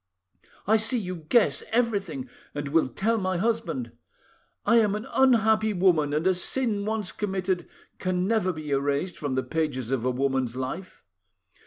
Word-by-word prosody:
I 220 +3 +4
see 225 +3 +2
you 185 -5 -3
guess 235 -3 +3
everything, 200 - 0 0.3
and 145 -1 -3
will 160 -1 +3
tell 225 - 0
my 185 -2 -1
husband. 165 - -1 0.7
I 235 - +5
am 210 -3 +3
an 215 +3 -5
unhappy 220 -4 +4
woman, 175 -6 +3
and 155 +3 0
a 190 - +4
sin 205 +2 0
once 215 -4 -2
committed 190 -3 -2 0.3
can 185 -1 0
never 215 -3 +1
be 155 -3 -7
erased 140 +5 0
from 145 -4 -2
the 130 - 0
pages 145 -7 -2
of 130 -4 0
a 130 - +1
woman's 130 -1 0
life! 130 +9 -6
185 Hz, 160 wpm, -26 LUFS, 145-215 Hz, 0.7 s, I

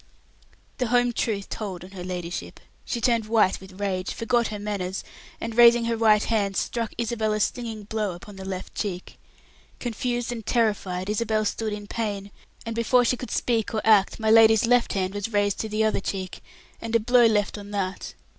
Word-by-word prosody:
The 250 - +1
home 245 +1 +2
truth 205 -4 -2
told 190 -5 -5
on 185 - -12
her 185 -2 -7
ladyship. 180 -1 -5 0.3
She 240 - -2
turned 230 -2 +1
white 215 -5 +2
with 190 0 -13
rage, 190 -2 -2
forgot 235 0 +1
her 210 - -5
manners, 200 -2 -3 0.4
and, 230 -1 -5
raising 235 0 +7
her 230 0 0
right 220 -2 +4
hand, 200 -4 0
struck 230 -2 -2
Isabel 225 -2 -1
a 215 - -1
stinging 225 -1 -2
blow 210 -2 -2
upon 200 +4 -12
the 190 - -8
left 190 -1 -6
cheek. 185 -4 -5 0.6
Confused 240 0 -2
and 230 -2 -5
terrified, 205 -5 0
Isabel 215 0 0
stood 215 +1 -2
in 205 0 -5
pain, 205 -2 -4 0.3
and 230 0 -4
before 240 +2 +3
she 250 - +2
could 250 - -7
speak 230 -2 0
or 215 - 0
act, 210 -2 +4
my 220 -1 +2
lady's 225 0 +6
left 245 0 +3
hand 190 -1 -1
was 205 +2 -4
raised 205 -1 +1
to 220 - -3
the 215 +1 0
other 220 - +1
cheek, 190 -1 -5 0.4
and 230 0 -3
a - - +6
blow 240 +1 +5
left 210 -2 +1
on 205 -1 -9
that. 195 -2 -4
215 Hz, 195 wpm, -25 LUFS, 200-230 Hz, 0.6 s, raising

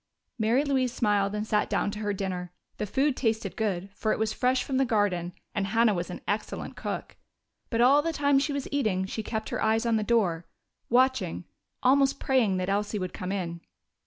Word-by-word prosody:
Mary 230 +6 +3
Louise 265 -4 +1
smiled 205 -3 +1
and 210 0 -2
sat 210 -1 +1
down 205 - 0
to 210 - -6
her 205 -1 -1
dinner. 185 -3 -3 0.3
The 210 - -3
food 270 +6 +1
tasted 220 -6 -1
good, 195 -3 -2
for 215 +1 -1
it - - +1
was 220 0 0
fresh 255 +2 +1
from 265 - -2
the 270 - +4
garden, 205 -8 +1 0.2
and 200 -4 -1
Hannah 225 +1 +3
was 175 -1 -3
an 180 - -7
excellent 210 +1 -3
cook. - - -5 0.5
But 230 0 +1
all 275 +4 +6
the 330 +2 -1
time 285 -3 +3
she 290 +2 -1
was 280 -1 -3
eating 215 -10 +1
she 215 +3 -4
kept 220 0 -4
her - - -3
eyes 220 +2 +2
on 230 -1 +3
the 215 - 0
door, 190 -8 +1 0.4
watching, 245 -9 +2 0.4
almost 270 +1 +4
praying 235 -8 +2
that 185 0 -2
Elsie 205 +2 0
would 185 -3 -4
come 180 +1 -4
in. 170 -4 -3
215 Hz, 205 wpm, -28 LUFS, 195-255 Hz, 0.5 s, all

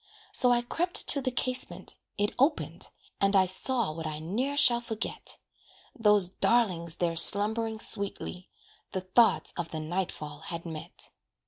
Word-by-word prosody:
So 250 - +5
I 240 0 +2
crept 350 +8 0
to 280 - +4
the 260 - -2
casement 255 0 -3 0.2
it 205 0 -1
opened, 290 +4 +3 0.3
And 195 0 +1
I 190 -1 +4
saw 220 +2 +1
what 160 0 -7
I 155 -1 -5
ne'er 235 - -4
shall 240 -5 +3
forget 225 -2 -4 0.6
Those 210 -6 +4
darlings 180 -5 0
there 170 -1 -2
slumbering 220 +5 +5
sweetly, 200 -3 -5 0.4
The 190 - -3
thoughts 185 +6 +1
of 175 -2 -4
the 160 - -6
night 175 +4 -4
fall 150 -1 -9
had 170 +1 -7
met. 160 -2 -5
200 Hz, 150 wpm, -27 LUFS, 170-240 Hz, 0.6 s, So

